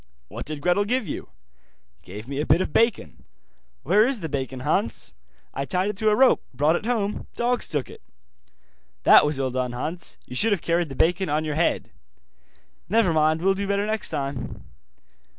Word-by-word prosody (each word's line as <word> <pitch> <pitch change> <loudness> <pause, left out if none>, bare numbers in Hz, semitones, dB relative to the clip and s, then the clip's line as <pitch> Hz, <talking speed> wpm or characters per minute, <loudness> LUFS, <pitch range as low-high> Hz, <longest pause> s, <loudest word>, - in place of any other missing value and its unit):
'What - - -7
did 150 -1 -5
Gretel 180 +5 +2
give 235 +2 -1
you?' - - -6 0.7
'Gave 105 - -10
me 140 +1 -4
a - - -2
bit 160 - +4
of 185 - -2
bacon.' 230 -1 +1 0.6
'Where 200 +8 +4
is 260 -6 -2
the 160 - -4
bacon, 135 -2 -4
Hans?' 115 -3 -1 0.4
'I 135 - -3
tied 180 +8 0
it 200 - -14
to 215 +1 +2
a 210 - +3
rope, 260 +3 +5
brought 150 +5 +3
it 210 - -3
home, 210 -4 -1
dogs 245 +1 0
took 145 -6 -2
it.' - - -13 1.0
'That - - +7
was 150 -1 -1
ill 135 -1 -1
done, 125 -1 -2
Hans, 160 +8 -5
you 125 - -9
should 215 - +2
have 190 - -2
carried 170 -1 +1
the 135 - -7
bacon 180 +4 +1
on 155 +2 0
your 155 - -2
head.' 165 +3 0 1.0
'Never 210 -4 +3
mind, 155 +1 +2
will 195 +1 +4
do 200 +1 -3
better 200 +1 0
next 220 0 -2
time. 135 -3 -4
165 Hz, 190 wpm, -24 LUFS, 140-205 Hz, 1.0 s, That